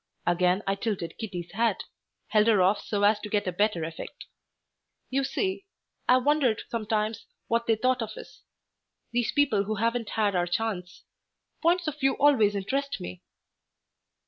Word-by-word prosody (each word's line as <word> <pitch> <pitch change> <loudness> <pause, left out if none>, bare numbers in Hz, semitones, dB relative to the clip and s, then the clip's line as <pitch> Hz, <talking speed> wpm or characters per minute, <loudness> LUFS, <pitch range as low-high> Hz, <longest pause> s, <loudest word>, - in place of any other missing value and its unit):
Again 180 +3 +2
I 195 - +1
tilted 195 -5 -3
Kitty's 180 -6 -5
hat, 225 -1 0 0.5
held 215 0 +4
her 220 -3 +5
off 190 +3 +3
so 205 -1 -2
as 210 +1 +4
to 210 - -7
get 205 0 0
a 185 - -1
better 190 -2 +1
effect. 165 0 -7 0.9
"You 270 +1 +1
see, 380 +6 -2 0.4
I've 255 0 +5
wondered 285 -7 +2
sometimes 215 -1 -2 0.2
what 230 0 0
they 225 - +4
thought 255 +3 +1
of 225 - -5
us - - -12 0.7
these 240 -1 0
people 225 -9 +2
who 215 +2 -2
haven't 230 +1 -1
had 210 -3 +1
our 175 0 +1
chance. 185 -2 -3 0.6
Points 345 0 +2
of 300 -1 -3
view 270 -1 +3
always 225 -8 +4
interest 275 +8 -2
me." 90 0 -7
215 Hz, 160 wpm, -27 LUFS, 195-250 Hz, 0.9 s, her